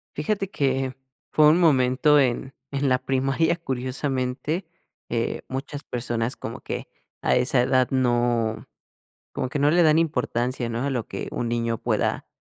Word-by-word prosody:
Fíjate 195 Hz, +5 st, -1 dB
que 135 Hz, -2 st, 0 dB, 0.4 s
fue 150 Hz, -1 st, +6 dB
un 160 Hz, +4 st, +5 dB
momento, 145 Hz, -1 st, +4 dB
en 130 Hz, 0 st, 0 dB, 0.2 s
en 140 Hz, -1 st, 0 dB
la 125 Hz, -, +3 dB
primaria, 135 Hz, +5 st, +1 dB
curiosamente, 130 Hz, +3 st, -2 dB, 0.4 s
eh, 115 Hz, -1 st, -1 dB
muchas 140 Hz, +2 st, -5 dB
personas 120 Hz, 0 st, -2 dB
como -, -, -7 dB
que -, -, -5 dB, 0.3 s
a -, -, +2 dB
esa 125 Hz, 0 st, +3 dB
edad 130 Hz, 0 st, +3 dB
no, 120 Hz, -3 st, +1 dB, 0.7 s
como -, -, -2 dB
que 145 Hz, +3 st, -3 dB
no 145 Hz, +1 st, +4 dB
le 175 Hz, -, +5 dB
dan 155 Hz, -1 st, +5 dB
importancia, 125 Hz, -5 st, -1 dB
¿no? 115 Hz, +1 st, -2 dB
A 140 Hz, -, 0 dB
lo 120 Hz, -4 st, -2 dB
que -, -, -5 dB
un 120 Hz, -, -2 dB
niño 115 Hz, -1 st, -1 dB
pueda -, -, -1 dB
130 Hz, 155 wpm, -24 LUFS, 125-145 Hz, 0.7 s, fue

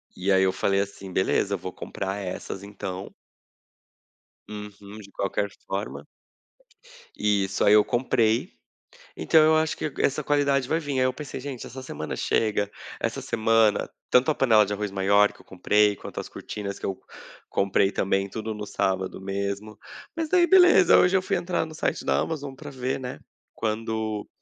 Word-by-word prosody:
E 95 Hz, +2 st, -1 dB
aí 95 Hz, 0 st, +5 dB
eu 95 Hz, -, +3 dB
falei 100 Hz, +1 st, +1 dB
assim: 100 Hz, -1 st, -7 dB
"Beleza, 100 Hz, +2 st, +1 dB
vou 90 Hz, +1 st, -6 dB
comprar 95 Hz, 0 st, -5 dB
essas, 95 Hz, 0 st, -6 dB
então." 95 Hz, -2 st, -7 dB, 1.4 s
Uhum. 105 Hz, -1 st, -9 dB
De 100 Hz, -2 st, -13 dB
qualquer 100 Hz, +1 st, -2 dB, 0.2 s
forma. 100 Hz, +2 st, -4 dB, 1.1 s
Isso! 100 Hz, -2 st, +1 dB
Aí 100 Hz, -, +6 dB
eu 105 Hz, 0 st, +7 dB
comprei. 120 Hz, -, +1 dB, 0.7 s
Então 160 Hz, -, +4 dB
eu 155 Hz, +1 st, +5 dB
acho 155 Hz, 0 st, +1 dB
que 155 Hz, -, -3 dB
essa 145 Hz, +2 st, +1 dB
qualidade 140 Hz, -2 st, +1 dB
vai 160 Hz, -, +1 dB
vim. 145 Hz, -4 st, -3 dB
Aí 130 Hz, -, +3 dB
eu 130 Hz, -, +2 dB
pensei: 145 Hz, 0 st, -7 dB
"Gente, 130 Hz, -2 st, -6 dB
essa 130 Hz, +2 st, -8 dB
semana 80 Hz, -11 st, -5 dB
chega, 105 Hz, -2 st, 0 dB, 0.3 s
essa -, -, -2 dB
semana, 110 Hz, -1 st, +2 dB, 0.2 s
tanto 125 Hz, +5 st, +4 dB
a -, -, +1 dB
panela 110 Hz, -6 st, +5 dB
de 100 Hz, -, -4 dB
arroz 105 Hz, 0 st, -3 dB
maior 100 Hz, +2 st, +3 dB
que -, -, -21 dB
eu -, -, -17 dB
comprei, 105 Hz, +2 st, +2 dB
quanto -, -, -7 dB
as -, -, -8 dB
cortinas 100 Hz, -2 st, -6 dB
que -, -, -5 dB
eu 95 Hz, -, -3 dB, 0.5 s
comprei, 100 Hz, 0 st, +2 dB
também, 95 Hz, 0 st, 0 dB
tudo 110 Hz, +2 st, -5 dB
no 105 Hz, 0 st, -6 dB
sábado 95 Hz, -1 st, -1 dB
mesmo." 100 Hz, +2 st, -4 dB, 0.4 s
Mas 325 Hz, -1 st, -2 dB
daí 350 Hz, +1 st, +4 dB
beleza, 355 Hz, -, +7 dB
hoje 180 Hz, +2 st, +4 dB
eu 190 Hz, -, +1 dB
fui -, -, 0 dB
entrar 175 Hz, -2 st, -1 dB
no 160 Hz, -, -10 dB
site -, -, -2 dB
da -, -, +2 dB
Amazon 145 Hz, -4 st, -4 dB
pra 145 Hz, +2 st, -9 dB
ver, 130 Hz, 0 st, -3 dB
né, 125 Hz, -1 st, -6 dB, 0.4 s
quando 110 Hz, -1 st, -2 dB
105 Hz, 170 wpm, -25 LUFS, 100-135 Hz, 1.4 s, eu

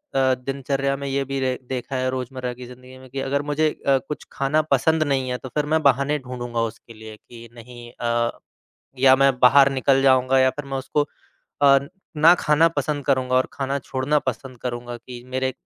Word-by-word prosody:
अ, 130 Hz, -1 st, +3 dB
दिनचर्या 135 Hz, +1 st, -2 dB
में 140 Hz, 0 st, -5 dB
ये 135 Hz, 0 st, -1 dB
भी 135 Hz, -, -1 dB
र 130 Hz, -1 st, 0 dB
देखा 130 Hz, +1 st, -4 dB
है, 130 Hz, 0 st, 0 dB
रोज़मर्रा 130 Hz, -1 st, -4 dB
की 125 Hz, -, -8 dB
ज़िंदगी 125 Hz, +1 st, -13 dB
में 130 Hz, 0 st, -15 dB
कि 135 Hz, -, -5 dB
अगर 140 Hz, +1 st, -1 dB
मुझे 155 Hz, +1 st, +2 dB, 0.2 s
अ, 135 Hz, -, +5 dB
कुछ 150 Hz, -, -6 dB
खाना 140 Hz, +3 st, +1 dB
पसंद 160 Hz, -1 st, +3 dB
नहीं 135 Hz, -3 st, -1 dB
है, 125 Hz, -, -2 dB
तो 130 Hz, -, -9 dB
फिर 150 Hz, +2 st, -1 dB
मैं 160 Hz, -, +3 dB
बहाने 140 Hz, +2 st, +2 dB
ढूँढूँगा 120 Hz, -3 st, -4 dB
उसके 115 Hz, 0 st, -17 dB
लिए 110 Hz, 0 st, -11 dB
कि 115 Hz, +1 st, -14 dB
नहीं 120 Hz, 0 st, -12 dB
अ, 120 Hz, 0 st, -1 dB, 0.6 s
या 130 Hz, 0 st, +6 dB
मैं 135 Hz, -1 st, +3 dB
बाहर 135 Hz, +2 st, +6 dB
निकल 135 Hz, 0 st, +2 dB
जाऊँगा 130 Hz, 0 st, +4 dB
या 130 Hz, 0 st, +4 dB
फिर 145 Hz, +2 st, -7 dB
मैं 135 Hz, -1 st, -4 dB
उसको 140 Hz, +2 st, 0 dB, 0.6 s
अ, 140 Hz, -1 st, +7 dB, 0.4 s
ना 160 Hz, +3 st, +7 dB
खाना 150 Hz, +2 st, +4 dB
पसंद 145 Hz, 0 st, -2 dB
करूँगा 130 Hz, -2 st, +1 dB
और 130 Hz, -, +2 dB
खाना 135 Hz, 0 st, -2 dB
छोड़ना 135 Hz, +2 st, -1 dB
पसंद 125 Hz, +1 st, -11 dB
करूँगा 120 Hz, -1 st, -5 dB
कि 120 Hz, 0 st, -11 dB
मेरे 130 Hz, 0 st, 0 dB
130 Hz, 200 wpm, -22 LUFS, 125-140 Hz, 0.6 s, अ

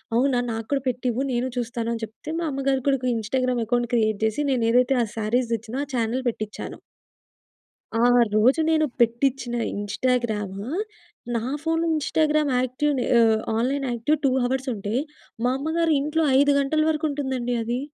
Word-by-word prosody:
"అవునా! 250 Hz, 0 st, +3 dB
నాకూడా 225 Hz, +5 st, -2 dB
పెట్టివ్వు 250 Hz, 0 st, -1 dB
నేను 245 Hz, +1 st, 0 dB
చూస్తాను" 235 Hz, -1 st, -3 dB
అని 230 Hz, -, -5 dB
చెప్తే 225 Hz, +8 st, -7 dB
మా 340 Hz, -, -1 dB
అమ్మగారు 270 Hz, 0 st, 0 dB
కూడా 275 Hz, -, +4 dB
ఒక 255 Hz, -, -3 dB
ఇంస్టాగ్రామ్‌లో 245 Hz, +1 st, -1 dB
అకౌంట్ 240 Hz, 0 st, 0 dB
క్రియేట్ 220 Hz, -3 st, +1 dB
జేసి 220 Hz, +6 st, +1 dB
నేనేదైతే 245 Hz, +1 st, +3 dB
ఆ -, -, 0 dB
సారీస్ 235 Hz, +3 st, 0 dB
దెచ్చిన 230 Hz, +5 st, -3 dB
ఆ -, -, -4 dB
చానెల్ 235 Hz, +2 st, 0 dB
పెట్టించాను. 215 Hz, -2 st, -6 dB, 1.2 s
ఆ -, -, +3 dB, 0.3 s
రోజు 255 Hz, +9 st, +4 dB
నేను 315 Hz, -1 st, +3 dB
పెట్టించిన 240 Hz, +1 st, +1 dB, 0.2 s
ఇంస్టాగ్రాము 210 Hz, -1 st, -1 dB, 0.7 s
నా 225 Hz, -, 0 dB, 0.2 s
ఫోన్‌లో 325 Hz, +1 st, 0 dB
ఇంస్టాగ్రామ్ 305 Hz, 0 st, +1 dB
యాక్టివ్‌ని 255 Hz, +1 st, 0 dB, 0.2 s
ఆహ్, 225 Hz, -1 st, +5 dB, 0.2 s
ఆన్లైన్ 270 Hz, +4 st, 0 dB
యాక్టివ్ 240 Hz, +7 st, +1 dB
2 -, -, +5 dB
హవర్స్ 260 Hz, +2 st, -1 dB
ఉంటే, 205 Hz, +2 st, -4 dB, 0.5 s
మా 250 Hz, -, +3 dB
అమ్మగారి 320 Hz, +3 st, +1 dB
ఇంట్లో 305 Hz, +3 st, 0 dB, 0.2 s
5 285 Hz, +1 st, +4 dB
గంటల 310 Hz, +3 st, +1 dB
వరకు 310 Hz, 0 st, 0 dB
ఉంటుందండి 265 Hz, -4 st, -2 dB
అది. 240 Hz, +2 st, -2 dB
250 Hz, 150 wpm, -24 LUFS, 230-275 Hz, 1.2 s, ఆహ్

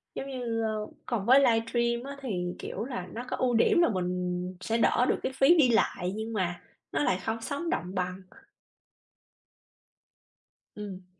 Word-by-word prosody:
giống 275 Hz, -, -4 dB
như, 240 Hz, -3 st, -2 dB
ơ, 215 Hz, -1 st, -2 dB, 0.2 s
còn 225 Hz, -5 st, -2 dB
với 260 Hz, +4 st, +7 dB
livestream 235 Hz, 0 st, +2 dB
á 280 Hz, 0 st, -7 dB
thì, 180 Hz, -8 st, -3 dB
kiểu, 210 Hz, -, -4 dB
là 245 Hz, -9 st, -5 dB
nó 235 Hz, +2 st, -5 dB
có -, -, -2 dB
ưu 250 Hz, -2 st, +1 dB
điểm 235 Hz, +9 st, +4 dB
là 340 Hz, -, +4 dB
mình 180 Hz, -1 st, -2 dB
sẽ 225 Hz, +3 st, 0 dB
đỡ 240 Hz, +1 st, +3 dB
được -, -, +1 dB
cái -, -, -1 dB
phí 270 Hz, +6 st, +5 dB
đi 280 Hz, -6 st, +5 dB
lại 190 Hz, -5 st, +1 dB
nhưng 220 Hz, +1 st, -4 dB
mà 180 Hz, -4 st, -1 dB, 0.3 s
nó 145 Hz, +1 st, 0 dB
lại 180 Hz, +5 st, +1 dB
không 225 Hz, 0 st, -2 dB
sống 290 Hz, +7 st, -3 dB
động 185 Hz, -, -2 dB
bằng. 180 Hz, +1 st, -2 dB, 2.6 s
Ừm. 190 Hz, -3 st, -7 dB
225 Hz, 170 wpm, -29 LUFS, 185-245 Hz, 2.6 s, với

